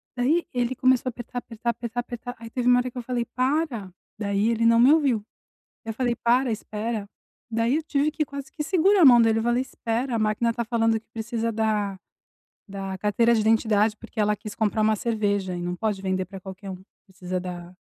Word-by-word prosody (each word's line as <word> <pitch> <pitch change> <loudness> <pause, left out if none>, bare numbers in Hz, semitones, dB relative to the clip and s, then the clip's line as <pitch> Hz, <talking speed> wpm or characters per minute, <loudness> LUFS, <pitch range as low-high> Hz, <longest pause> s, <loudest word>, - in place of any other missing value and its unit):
Daí 290 +8 +2
ele 245 +1 0
começou 255 0 +3
a - - -5
apertar, 240 +1 -6
apertar, 235 0 -3
apertar, 235 +1 -5
apertar. 245 0 -7
Aí 230 - -9
teve 250 -1 -1
uma 245 0 +6
hora 250 0 -2
que 255 - -12
eu - - -2
falei: 240 0 -2
"Para" 255 - 0 0.3
Daí 200 +1 +1
ele 230 0 0
não 230 0 +5
me 265 +5 +7
ouviu. 265 -9 +2 0.6
Eu 225 - -3
falei: 245 0 0
"Para, 245 +1 +2
espera." 215 0 -4 0.4
Daí 230 +4 +1
eu 320 - -3
tive 295 0 +1
que 305 0 -1
quase 275 -1 -8
que 300 - -4
segurar 380 +3 +3
a - - +8
mão 240 -3 +8
dele 225 -1 +3
e - - -1
falar: 240 +1 +1
"Espera, 240 -1 -2
a - - 0
máquina 215 +2 +1
tá 235 -1 -3
falando 225 -1 +1
que 220 - -34
precisa 230 0 -2
da 210 -3 0 0.7
da 195 -1 -5
carteira 215 +4 +2
de 220 - +2
identidade", 220 -1 +3
porque 230 -1 -10
ela 210 0 +2
quis 210 0 -9
comprar 220 0 0
uma 215 0 +3
cerveja 205 -4 -1
e 175 - -4
não 175 0 -3
pode 210 -1 -2
vender 190 -1 -1
pra 195 +1 -9
qualquer 190 +1 -9
um. 185 0 -9 0.2
Precisa 185 -2 -5
da 180 0 -7
230 Hz, 215 wpm, -25 LUFS, 210-245 Hz, 0.7 s, a